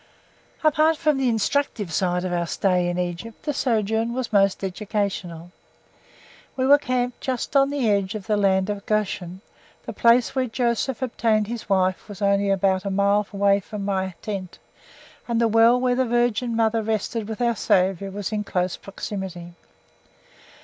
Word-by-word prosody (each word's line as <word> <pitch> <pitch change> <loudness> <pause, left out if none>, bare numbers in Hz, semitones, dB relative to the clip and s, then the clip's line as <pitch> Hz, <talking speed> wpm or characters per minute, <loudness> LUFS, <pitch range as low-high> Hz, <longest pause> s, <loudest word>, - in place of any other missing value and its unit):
Apart 310 +1 +3
from 305 -4 +1
the 260 -2 +2
instructive 225 - -1
side 180 +1 0
of 180 - -2
our 170 -1 -1
stay 180 0 +1
in 175 - -3
Egypt, 180 +5 -5
the 295 - -2
sojourn 225 -2 0
was 255 -3 -4
most 195 -1 +3
educational. 190 -3 -3 1.0
We 260 - 0
were 285 +2 +6
camped 250 -2 -2
just 260 +1 -3
on 275 0 +5
the 280 -4 -1
edge 200 -1 +1
of 210 - -6
the 215 -1 +1
Land 195 -1 +2
of 200 -1 -6
Goshen; 190 -4 -2 0.4
the - - -6
place 235 +1 +3
where 260 -1 0
Joseph 240 +2 -1
obtained 225 -3 +1
his 230 0 -7
wife 185 +1 +1
was 205 - -9
only 200 0 +2
about 190 -1 +1
a 200 - -3
mile 200 +1 +2
away 200 0 +3
from 200 +1 -7
my 190 -2 -2
tent, 195 -4 -5 0.7
and 235 -1 0
the 230 - +3
well 225 +2 +5
where 250 0 +1
the 255 0 +1
Virgin 240 0 +1
Mother 225 0 +2
rested 220 0 -2
with 220 - -5
our 235 -1 +1
Saviour 190 0 +1
was 200 +1 -5
in 210 -1 -1
close 180 -3 -2
proximity. 190 -3 -7
210 Hz, 170 wpm, -23 LUFS, 190-235 Hz, 1.0 s, were